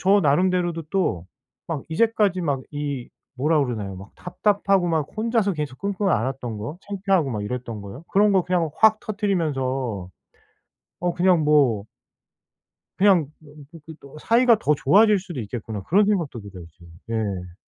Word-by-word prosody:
저 195 +2 +4
나름대로도 175 +2 +1
또 110 - -1 0.4
막 150 -5 -4
이제까지 205 +1 +1
막 140 -5 -1
이 145 -4 -4 0.3
뭐라 150 +3 +2
그러나요 105 -6 -4
막 100 +1 -11
답답하고 195 0 +1
막 160 -3 0
혼자서 220 -2 +1
계속 150 -4 -5
끙끙 200 0 -1
앓았던 120 - -1
거 115 +10 -6
창피하고 195 -7 0
막 105 -4 -3
이랬던 115 -1 -5
거요. 100 +9 -9
그런 205 +1 +4
거 190 - +3
그냥 175 -3 0
확 220 0 +5
터뜨리면서 135 - -2 0.9
어 175 -1 -1
그냥 180 -3 +3
뭐 130 -9 +3 1.1
그냥 185 -6 +4
뭐 150 -2 -17 0.2
그렇게 160 -1 -12
또 140 +2 -14
'사이가 235 +2 +4
더 150 - +2
좋아질 205 +8 +4
수도 175 -6 -7
있겠구나.' 110 -1 -6
그런 200 - +3
생각도 170 - -1
들어요 95 -4 -10
지금. 85 -1 -16 0.2
예. 95 -6 -3
155 Hz, 315 characters per minute, -23 LUFS, 125-195 Hz, 1.1 s, 확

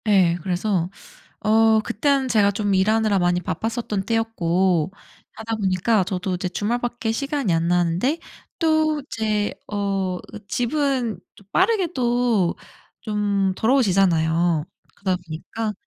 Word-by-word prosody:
예. 185 -5 +4
그래서 180 0 -1 0.5
어 220 0 +4
그땐 270 +5 0
제가 210 -4 +4
좀 205 0 -1
일하느라 215 +1 +2
많이 175 0 +2
바빴었던 210 +2 -3
때였고 185 -7 +1 0.4
하다 225 0 -3
보니까 195 +1 +1
저도 185 0 -2
이제 180 0 -2
주말 215 +6 -1
밖에 240 -2 -2
시간이 275 - -1
안 165 0 +1
나는데 175 - +1 0.4
또 315 -2 +2
제 215 -2 -1 0.2
어 195 -3 -1 0.3
집은 250 -2 0 0.2
좀 200 - -19
빠르게 385 -2 +3
또 240 -7 +1 0.5
좀 205 -3 0
더러워지잖아요. 175 - +2 0.3
그러다 190 -2 -1
보니까 205 +7 -4
210 Hz, 255 characters per minute, -22 LUFS, 185-230 Hz, 0.5 s, 예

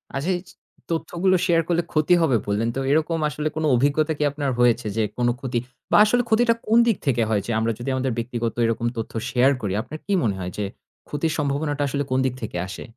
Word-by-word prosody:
আচ্ছা 145 +7 -2
এই - - -8
ছিচ - - -19 0.3
তথ্যগুলো 175 +3 +1
share 165 -1 +3
করলে 170 -1 +1
ক্ষতি 155 +3 +3
হবে 135 -8 +3
বললেন। 105 +3 0
তো - - -1
এরকম 160 +2 +2
আসলে 150 +1 -3
কোন 160 - -2
অভিজ্ঞতা 145 +5 +2
কি 150 - 0
আপনার 140 -2 -2
হয়েছে 120 -2 +3
যে 110 - +3
কোন 120 0 +1
ক্ষতি 130 -3 -3 0.3
বা - - +6
আসলে 245 +3 +2
ক্ষতিটা 230 +1 +4
কোন 225 +2 +4
দিক 225 - +2
থেকে 120 -3 +2
হয় 105 -2 +1
যে 120 - -3
আমরা 115 +1 +1
যদি 130 +3 -4
আমাদের 130 0 -1
ব্যক্তিগত 115 -1 -2
এরকম 115 +1 0
তথ্য 115 - -4 0.2
share 130 +3 +4
করি, 100 -3 -2
আপনার 135 +6 -8
কি 200 - -4
মনে 100 -4 +1
হয় 90 0 -4
যে 105 - -1 0.4
ক্ষতির 150 +2 -1
সম্ভাবনাটা 145 0 -1
আসলে 140 +1 -1
কোন 130 - +2
দিক 130 - 0
থেকে 105 -5 -4
আসে? 95 - -7
140 Hz, 220 wpm, -23 LUFS, 120-160 Hz, 0.4 s, বা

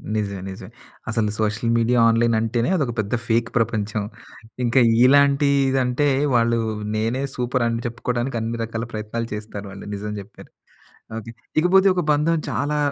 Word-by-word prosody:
నిజమే. 100 -2 -2
నిజమే. 95 - -9 0.4
అసలు 110 -2 0
సోషల్ 110 +2 0
మీడియా, 120 +2 +2
ఆన్‌లైన్ 115 0 +2
అంటేనే 115 +4 0
అదొక 140 -9 -1
పెద్ద 105 0 -2
ఫేక్ 115 +1 +1
ప్రపంచం. 110 -2 -1 0.6
ఇంక 120 +1 -1 0.3
ఇలాంటిదంటే, 140 -1 +3 0.3
వాళ్ళూ 115 0 +3 0.4
నేనే 115 +4 -1
సూపరని 120 -2 -1
చెప్పుకోడానికి 120 +1 -2
అన్ని 115 +1 -3
రకాల 115 0 -4
ప్రయత్నాలు 110 +2 -4
చేస్తారు 105 -1 -6
వాళ్ళు. 100 - -10
నిజం 105 +1 -5
జెప్పారు. 100 +2 -13 0.7
ఓకె. 115 +1 -7 0.3
ఇకపోతే 190 +4 +4
ఒక 180 - +1
బంధం 150 +3 +2
చాలా 145 +5 -1
115 Hz, 135 wpm, -22 LUFS, 110-130 Hz, 0.7 s, ఇకపోతే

